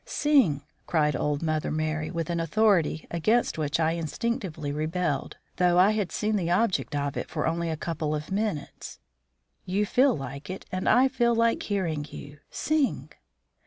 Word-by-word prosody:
"Sing!" 255 Hz, -, +2 dB, 0.2 s
cried 150 Hz, -4 st, +2 dB
old 145 Hz, +3 st, -1 dB
Mother 155 Hz, -1 st, 0 dB
Merry, 155 Hz, 0 st, -2 dB
with 165 Hz, 0 st, -3 dB
an 170 Hz, -, -1 dB
authority 170 Hz, -2 st, +2 dB
against 215 Hz, +3 st, +1 dB
which 150 Hz, +1 st, 0 dB
I 160 Hz, 0 st, +2 dB
instinctively 170 Hz, -, -3 dB
rebelled, 155 Hz, -1 st, -2 dB, 0.2 s
though 180 Hz, -1 st, +3 dB
I 190 Hz, +3 st, +6 dB
had 210 Hz, -4 st, -1 dB
seen 215 Hz, 0 st, 0 dB
the 175 Hz, -3 st, -1 dB
object 185 Hz, -4 st, +1 dB
of 145 Hz, -1 st, -1 dB
it -, -, -4 dB
for 155 Hz, -1 st, -2 dB
only 165 Hz, +1 st, -1 dB
a 160 Hz, -, -2 dB
couple 155 Hz, -1 st, -2 dB
of 150 Hz, +4 st, -6 dB
minutes. 200 Hz, -7 st, -3 dB, 0.7 s
"You 200 Hz, +3 st, 0 dB
feel 255 Hz, -, +3 dB
like 140 Hz, +2 st, -7 dB
it, 185 Hz, -, -6 dB
and 185 Hz, 0 st, -1 dB
I 250 Hz, +4 st, +6 dB
feel 235 Hz, -2 st, +1 dB
like 230 Hz, 0 st, +2 dB
hearing 165 Hz, -8 st, -2 dB
you. 145 Hz, +1 st, -10 dB
SING!" 305 Hz, -3 st, -1 dB
170 Hz, 165 wpm, -27 LUFS, 155-210 Hz, 0.7 s, I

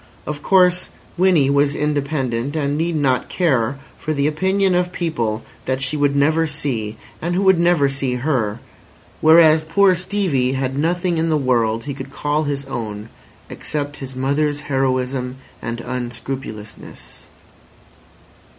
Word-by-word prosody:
Of 150 Hz, -1 st, -5 dB
course, 180 Hz, -1 st, +3 dB, 0.3 s
Winnie 175 Hz, -7 st, +3 dB
was 140 Hz, 0 st, +2 dB
independent, 140 Hz, -3 st, -1 dB
and 145 Hz, -2 st, 0 dB
need 165 Hz, +2 st, -1 dB
not 135 Hz, -4 st, +1 dB
care 140 Hz, -7 st, +1 dB, 0.2 s
for 155 Hz, 0 st, -2 dB
the 140 Hz, 0 st, +1 dB
opinion 190 Hz, +5 st, +1 dB
of 180 Hz, 0 st, +1 dB
people 120 Hz, -12 st, -2 dB, 0.2 s
that 130 Hz, 0 st, -1 dB
she 135 Hz, +3 st, -1 dB
would 145 Hz, -1 st, +1 dB
never 155 Hz, +3 st, +3 dB
see 135 Hz, -8 st, -3 dB, 0.2 s
and 175 Hz, +2 st, -1 dB
who 190 Hz, -, +1 dB
would 190 Hz, -3 st, +5 dB
never 170 Hz, -4 st, +4 dB
see 135 Hz, -2 st, -1 dB
her; 120 Hz, -5 st, -1 dB, 0.6 s
whereas 160 Hz, 0 st, +6 dB
poor 185 Hz, +5 st, +4 dB
Stevie 180 Hz, -9 st, 0 dB
had 135 Hz, 0 st, -2 dB
nothing 170 Hz, +3 st, 0 dB
in 165 Hz, +1 st, +1 dB
the 155 Hz, -, +2 dB
world 115 Hz, -4 st, +1 dB
he 140 Hz, -, -4 dB
could 135 Hz, 0 st, -8 dB
call 150 Hz, +2 st, -1 dB
his 140 Hz, -1 st, -3 dB
own 110 Hz, -4 st, -5 dB, 0.4 s
except 145 Hz, -1 st, -4 dB
his 135 Hz, -2 st, -8 dB
mother's 145 Hz, +3 st, 0 dB
heroism 130 Hz, -2 st, -1 dB, 0.3 s
and 115 Hz, 0 st, -4 dB
unscrupulousness. 120 Hz, -3 st, -7 dB
145 Hz, 140 wpm, -20 LUFS, 130-160 Hz, 0.6 s, whereas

